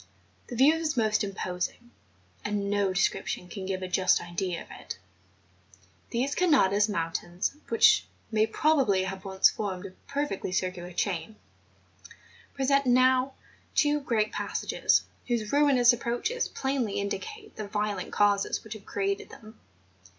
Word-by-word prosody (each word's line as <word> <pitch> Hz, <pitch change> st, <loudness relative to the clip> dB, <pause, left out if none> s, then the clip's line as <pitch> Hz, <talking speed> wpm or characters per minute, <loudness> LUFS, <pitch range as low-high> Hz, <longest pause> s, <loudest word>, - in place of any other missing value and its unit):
This 240 Hz, -, -6 dB
view 275 Hz, +5 st, +6 dB
is 320 Hz, -3 st, -2 dB
most 215 Hz, -1 st, +2 dB
imposing; 195 Hz, +4 st, -4 dB, 0.5 s
and 205 Hz, -1 st, -1 dB
no 205 Hz, -1 st, +2 dB
de¬ 185 Hz, -, -2 dB
scription 190 Hz, -2 st, 0 dB
can 190 Hz, 0 st, -7 dB
give 190 Hz, -1 st, -3 dB
a -, -, -3 dB
just 185 Hz, 0 st, +3 dB
idea 175 Hz, +1 st, -3 dB
of -, -, -21 dB
it. -, -, -8 dB, 1.1 s
These 255 Hz, +4 st, -1 dB
Canadas 215 Hz, -, +3 dB
mountains 175 Hz, +3 st, -2 dB
which 230 Hz, -, +5 dB, 0.2 s
may 220 Hz, 0 st, +3 dB
probably 240 Hz, -7 st, +2 dB
have 190 Hz, 0 st, -5 dB
once 190 Hz, 0 st, +4 dB
formed 195 Hz, -3 st, -4 dB
a 195 Hz, -, -7 dB, 0.2 s
perfectly 280 Hz, -10 st, -2 dB
circular 180 Hz, -1 st, -2 dB
chain, 190 Hz, +3 st, -2 dB, 1.2 s
present 275 Hz, 0 st, +2 dB
now 255 Hz, +1 st, +4 dB, 0.4 s
two 295 Hz, 0 st, +3 dB
great 220 Hz, -6 st, 0 dB
passages -, -, +1 dB, 0.2 s
whose 230 Hz, -4 st, -1 dB
ruinous 270 Hz, -4 st, +5 dB
approaches 240 Hz, -, -1 dB
plainly 265 Hz, -6 st, -2 dB
indicate 425 Hz, -, -5 dB
the 215 Hz, -, -5 dB
violent 205 Hz, -2 st, -2 dB
causes 205 Hz, -1 st, +2 dB
which 220 Hz, -, -7 dB
have 215 Hz, -2 st, -11 dB
created 200 Hz, 0 st, -2 dB
them. 220 Hz, 0 st, -14 dB
215 Hz, 135 wpm, -28 LUFS, 190-260 Hz, 1.2 s, view